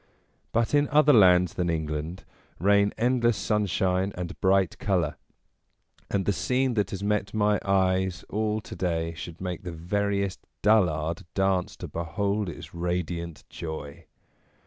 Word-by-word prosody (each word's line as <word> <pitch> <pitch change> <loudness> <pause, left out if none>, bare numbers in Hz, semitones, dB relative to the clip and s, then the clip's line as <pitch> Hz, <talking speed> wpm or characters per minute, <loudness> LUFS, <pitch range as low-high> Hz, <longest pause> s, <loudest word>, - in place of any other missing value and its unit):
But 115 +3 +1
in 145 0 +4
other 150 0 +5
lands 90 -5 +6
than 90 -1 -1
England 80 +2 -3 0.3
reign 100 +3 +3
endless 120 -1 +2
sunshine 95 -2 0
and 90 0 -6
bright 95 -1 +2
colour, 90 -7 0 0.9
and 95 -2 0
the 100 - +2
scene 130 +4 0
that 105 -4 0
has 95 0 -5
met 105 +1 -1
my 105 -1 +2
eyes 95 -2 +1
all 110 0 -1
to - - -9
day 85 -2 -1
should 80 +1 -8
make 90 -2 -4
the 90 - -6
veriest 100 +3 -1 0.2
dullard 85 -7 +2
dance 95 -2 +1
to - - -6
behold 100 +5 -2
its 85 - -9
radiant 85 -1 -3
joy. 80 -4 -7
95 Hz, 140 wpm, -27 LUFS, 85-105 Hz, 0.9 s, lands